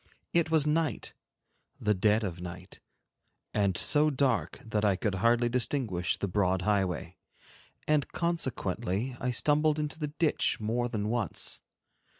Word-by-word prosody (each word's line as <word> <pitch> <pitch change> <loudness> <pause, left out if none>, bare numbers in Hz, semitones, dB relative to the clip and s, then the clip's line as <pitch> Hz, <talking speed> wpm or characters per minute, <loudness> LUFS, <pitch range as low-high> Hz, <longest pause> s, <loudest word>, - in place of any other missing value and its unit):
It 170 -2 +3
was 160 -2 +3
night, 150 -4 0 0.7
the 105 - +2
dead 105 +3 +2
of 90 -3 -4
night, 90 +2 -8 0.7
and 100 -4 +1
so 150 +1 +4
dark 135 -4 0
that 110 -1 -1
I 100 -2 +3
could 100 +1 -1
hardly 115 +5 +3
distinguish 115 - 0
the 100 - -2
broad 95 -1 +1
highway, 95 -3 0 0.7
and 150 -2 +2
consequently 130 - -1
I 125 - -1
stumbled 150 +4 +2
into 150 +1 -3
the 150 - -1
ditch 155 +1 0
more 120 +3 -1
than 105 -2 -2
once. 115 -6 -1
115 Hz, 140 wpm, -30 LUFS, 95-145 Hz, 0.7 s, so